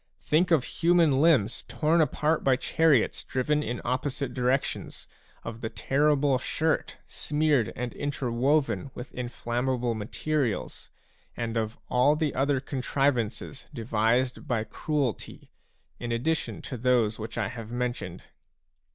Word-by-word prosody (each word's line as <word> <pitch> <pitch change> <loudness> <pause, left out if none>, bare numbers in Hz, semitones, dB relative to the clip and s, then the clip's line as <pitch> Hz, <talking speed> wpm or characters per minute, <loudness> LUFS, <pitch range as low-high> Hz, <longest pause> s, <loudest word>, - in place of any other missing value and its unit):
Think 165 +4 +3
of 160 -7 +4
human 165 -5 +3
limbs 140 -9 +3
torn 160 +2 +2
apart 155 +2 +1
by 135 -1 +4
chariots 145 -1 +2
driven 150 +4 0
in 120 -4 -3
opposite 130 +1 -2
directions, 130 +2 -1 0.4
of 115 0 -7
the 110 - -3
terrible 145 0 +2
shirt 155 +4 -1
smeared 150 -6 +1
and 125 0 -4
interwoven 140 +1 0
with 125 - -8
inflammable 125 0 -1
materials, 120 +3 -2 0.5
and 115 -1 -3
of 110 -1 -2
all 130 +4 +4
the 155 -2 0
other 140 0 +1
contrivances 130 -2 -1
devised 115 +2 0
by 115 -3 0
cruelty, 135 +1 -3 0.5
in 120 -1 -4
addition 145 +8 -1
to 130 - -5
those 120 -3 +2
which 110 +1 -6
I 105 -4 0
have 115 -1 -8
mentioned 120 -7 -3
130 Hz, 125 wpm, -27 LUFS, 120-150 Hz, 0.5 s, of